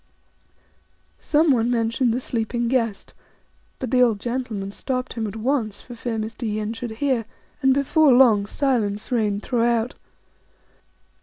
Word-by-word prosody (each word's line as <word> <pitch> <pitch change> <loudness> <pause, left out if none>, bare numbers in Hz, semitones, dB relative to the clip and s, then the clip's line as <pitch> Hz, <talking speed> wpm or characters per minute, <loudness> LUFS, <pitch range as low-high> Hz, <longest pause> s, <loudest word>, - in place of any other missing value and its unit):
Someone 285 -7 +2
mentioned 230 +1 +1
the 240 - 0
sleeping 235 -1 -2
guest; 230 -5 -1 0.6
but 255 - -5
the 255 - +4
old 230 -5 +3
gentleman 235 -5 -3
stopped 255 +4 -3
him 225 -2 -3
at 205 - -7
once 225 -3 -1
for 245 - -11
fear 235 -1 -4
Mr. 220 +1 -4
Yin 215 +1 -2
should 235 +1 -5 0.2
hear, 255 -5 +1 0.4
and 265 -1 +4
before 280 +2 +4
long 230 -6 +5
silence 220 -6 -1
reigned 210 -4 0
throughout. 235 -1 +1
235 Hz, 135 wpm, -23 LUFS, 220-255 Hz, 0.6 s, long